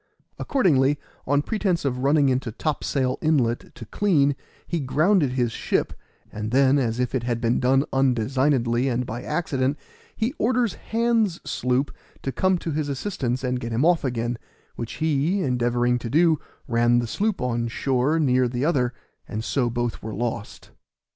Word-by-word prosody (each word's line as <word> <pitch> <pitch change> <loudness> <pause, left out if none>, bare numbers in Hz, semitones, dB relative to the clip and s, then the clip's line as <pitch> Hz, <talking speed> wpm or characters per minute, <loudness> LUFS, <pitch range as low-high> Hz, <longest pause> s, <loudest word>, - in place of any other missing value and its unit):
Accordingly, 145 - +2 0.3
on 145 +2 +2
pretense 190 -7 -1
of 125 -2 -1
running 140 +2 +3
into 130 -2 0
Topsail 135 0 -1
inlet 130 -7 0
to 115 - -9
clean, 145 - +2 0.3
he 170 - -2
grounded 150 +2 +2
his 120 -3 0
ship, - - -1 0.4
and 105 0 -4
then, 135 +3 +4
as 120 -2 -1
if 125 -1 -1
it 130 - 0
had 120 -1 -2
been 115 +1 +1
done 135 +3 +3
undesignedly 130 0 +2
and 125 0 -1
by 120 +2 -5
accident, 145 -2 -1 0.4
he 235 +4 -1
orders 240 -2 +2
Hands' 225 -5 0
sloop 125 +3 -1 0.3
to 135 - -2
come 185 +5 +2
to 170 - -4
his 150 -1 -2
assistance 135 -4 -2
and 125 -1 -1
get 115 -1 -5
him 120 +6 +1
off 175 -1 +3
again, 120 -2 -2 0.4
which 115 - -5
he, 160 +5 0
endeavoring 120 -1 +1
to 115 - -5
do, 160 +2 +3 0.3
ran 120 0 +3
the 120 - +1
sloop 205 - -1
on 120 -2 -1
shore 135 +5 0
near 130 -4 +3
the 125 +3 -2
other, 130 -7 +1 0.3
and 110 -1 -4
so 130 +1 0
were - - 0
both 120 0 -2
lost. 110 0 -5
130 Hz, 165 wpm, -24 LUFS, 120-155 Hz, 0.4 s, then